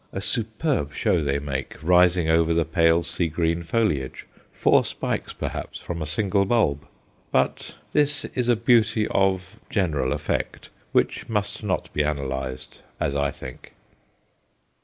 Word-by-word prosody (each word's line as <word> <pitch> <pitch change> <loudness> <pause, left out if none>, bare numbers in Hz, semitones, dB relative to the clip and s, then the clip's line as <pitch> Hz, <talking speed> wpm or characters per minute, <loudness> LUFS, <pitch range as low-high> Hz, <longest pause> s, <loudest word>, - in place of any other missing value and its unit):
A - - -4
superb 110 - 0
show 85 -4 +1
they 70 -1 0
make, 70 -2 -4
rising 90 0 +4
over 80 0 +3
the 85 -1 +2
pale 80 +1 +3
sea 85 +1 +1
green 85 +1 0
foliage, 85 - -1 0.3
four - - +3
spikes - - -3
perhaps - - -5
from 85 -1 -5
a 75 - -3
single 100 +4 +1
bulb. 95 -10 +1 0.4
But - - 0 0.2
this 145 -1 +2
is 125 -1 0
a 120 - +5
beauty 115 -2 +3
of 95 +1 0
general 75 - 0
effect, - - -3 0.2
which - - 0
must 105 -1 -2
not 95 -5 -2
be 75 - +1
analyzed, 65 -3 -4 0.2
as 70 - -1
I 70 0 +1
think. 65 -2 -10
85 Hz, 140 wpm, -24 LUFS, 75-105 Hz, 0.4 s, a